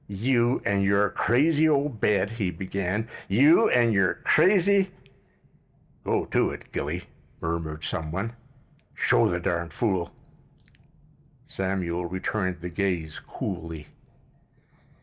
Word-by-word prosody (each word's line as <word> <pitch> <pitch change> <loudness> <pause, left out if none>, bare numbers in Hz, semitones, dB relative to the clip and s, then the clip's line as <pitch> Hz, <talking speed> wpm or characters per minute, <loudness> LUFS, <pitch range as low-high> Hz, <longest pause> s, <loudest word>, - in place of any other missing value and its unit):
"You 120 +4 +1
an' 100 -1 +1
your 100 +1 +2
crazy 150 +9 +3
ole 145 -1 +2
bed," 105 -5 0
he 110 -5 -2
began. 100 +3 -3 0.2
"You 150 - +5
an' 120 -2 +3
your 95 -3 +2
crazy——" 195 0 +4 1.1
"Go - - 0
to - - +1
it, - - -9
Gilly," - - -3 0.4
murmured 80 -2 -4
some 80 -3 -3
one. 100 +7 -3 0.6
"Show - - +3
the 90 - -1
darn 85 -1 -2
fool—" 95 -5 -1 1.3
Samuel 90 -5 -2
returned 95 0 -3
the 90 - -5
gaze 85 -4 -2
coolly. 80 -2 -6
100 Hz, 110 wpm, -26 LUFS, 85-120 Hz, 1.3 s, You